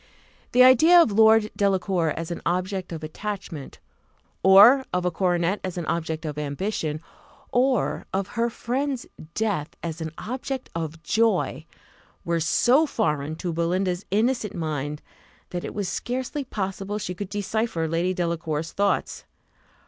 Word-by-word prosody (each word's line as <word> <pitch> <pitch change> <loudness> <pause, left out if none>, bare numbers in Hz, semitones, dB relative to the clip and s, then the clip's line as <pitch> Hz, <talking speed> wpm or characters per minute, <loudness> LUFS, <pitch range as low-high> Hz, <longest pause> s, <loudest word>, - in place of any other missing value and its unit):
The 250 - +7
idea 310 +8 +7
of 330 -10 +5
Lord 220 0 +5
Delacour 190 -4 +1
as 165 +1 -4
an 170 - -4
object 185 +1 -2
of 160 -2 -6
attachment, 180 -2 -6 0.6
or 205 +8 +8
of 180 0 -1
a 180 - +1
coronet 180 +2 +1
as 185 -1 -4
an 170 - -3
object 160 0 -2
of 150 -1 -4
ambition, 155 +1 -3 0.5
or 255 +1 +1
of 195 0 -2
her 235 0 0
friend's 260 +3 -2 0.3
death 200 -9 -1
as 165 -1 -4
an 160 -1 -4
object 260 +2 -5
of 165 0 -5
joy, 225 +8 +1 0.6
were 170 0 0
so 250 - +3
foreign 150 - -1
to 175 +1 -4
Belinda's 180 +3 0
innocent 220 +1 0
mind, 150 -2 -3 0.5
that 175 -1 -4
it - - -6
was 205 -2 -2
scarcely 260 - -3
possible 195 -2 -4
she 185 -3 -4
could 185 +1 -6
decipher 205 -4 -1
Lady 170 +3 0
Delacour's 165 -2 -2
thoughts. 200 0 -1
185 Hz, 140 wpm, -25 LUFS, 165-220 Hz, 0.6 s, or